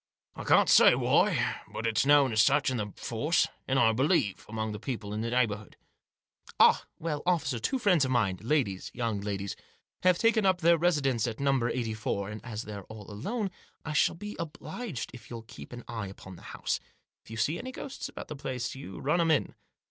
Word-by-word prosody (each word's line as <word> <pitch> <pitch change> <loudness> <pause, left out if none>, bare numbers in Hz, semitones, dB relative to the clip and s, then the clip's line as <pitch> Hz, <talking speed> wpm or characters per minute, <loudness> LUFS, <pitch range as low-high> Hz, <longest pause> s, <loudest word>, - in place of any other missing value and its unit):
" - - -44
I - - -7
can't - - +5
say - - +7
why; - - +2
but 115 - -4
it's 115 +4 +2
known 145 -3 +6
as 110 - +5
such, 140 +3 +3
in 130 - -1
the 105 -2 -3
force, 145 +9 +1 0.2
and, 135 - +1
I 115 -3 +5
believe, 130 - +1
among 110 0 -3
the 105 - -6
people 110 -6 -4
in 105 - -2
the 115 - -2
neigh 125 +1 +4
bourhood." 105 -1 -7 0.5
" - - -23
Ah! - - +6
Well, 155 -2 -3
officer, 145 -9 +1
two 265 - 0
friends 190 - +3
of 130 - 0
mine 110 -8 +1
— - - -17
ladies 115 -7 0
— - - -38
young 115 -5 -1
ladies 100 -1 -3 0.2
— - - -51
have 180 -1 +4
taken 225 0 +3
up 185 -2 +3
their 170 +1 +6
residence 140 -9 +2
at 115 -2 -5
No. 135 -4 +2
84, 110 -4 -2
and 105 - -8
as 115 -2 -5
they're 100 -2 -8
all 110 -2 -10
alone 200 - -3 0.3
I 160 - -3
shall 150 +2 +3
be 210 +4 -7
obliged 160 - -5
if 115 -3 -12
you'll 115 -2 -7
keep 115 - -11
an 120 -1 -8
eye 110 -4 -4
upon 95 -1 -10
the - - -14
house. - - -2 0.4
If - - -18
you 115 - -7
see 150 +9 0
any 255 +1 -6
ghosts 270 +1 -6
about - - -8
the 150 - -6
place 125 -4 -4
you 130 -7 -8
run 150 +5 +1
'em 165 - +2
in." 155 - +2
125 Hz, 225 wpm, -29 LUFS, 110-155 Hz, 0.5 s, say